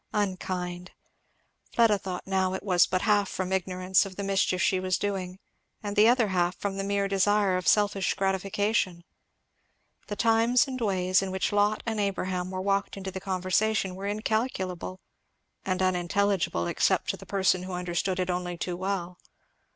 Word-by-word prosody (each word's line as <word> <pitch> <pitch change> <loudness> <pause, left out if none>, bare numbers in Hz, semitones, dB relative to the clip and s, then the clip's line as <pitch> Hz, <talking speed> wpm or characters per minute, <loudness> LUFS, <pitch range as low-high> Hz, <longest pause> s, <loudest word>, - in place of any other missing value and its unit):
Unkind. 185 -3 -2 0.9
Fleda 225 -4 +4
thought 185 -2 -5
now 190 -1 0
it - - -6
was 180 -3 +4
but 185 0 -1
half 205 -2 +3
from 185 0 -3
ignorance 185 0 +1
of 195 -2 -8
the 200 - -4
mischief 195 -2 +1
she 185 +1 +2
was 185 -1 0
doing, 190 -3 -3 0.5
and 205 -1 -4
the 210 +2 +6
other 240 -3 +3
half 180 -1 +1
from 195 -1 -3
the 195 - -2
mere 200 0 0
desire 200 0 +2
of 180 -2 -2
selfish 205 -2 +2
gratification. 195 -1 0 1.0
The 205 - -4
times 230 +4 +3
and 255 -2 -5
ways 185 -3 +2
in 195 - -3
which 190 0 -1
Lot 205 +1 +2
and 220 -2 -2
Abraham 185 -2 -1
were 185 0 -4
walked 200 +1 0
into 190 -1 -5
the 190 0 -6
conversation 190 +1 0
were 195 +2 -5
incalculable, 205 -4 -2 0.6
and 185 0 -1
unintelligible 185 - +1
except - - +1
to - - -8
the - - -13
person 190 -2 +2
who 185 0 -6
understood 180 +1 -2
it 185 0 0
only 180 -1 -3
too 180 +1 -3
well. 180 -1 -3
190 Hz, 165 wpm, -27 LUFS, 185-205 Hz, 1.0 s, the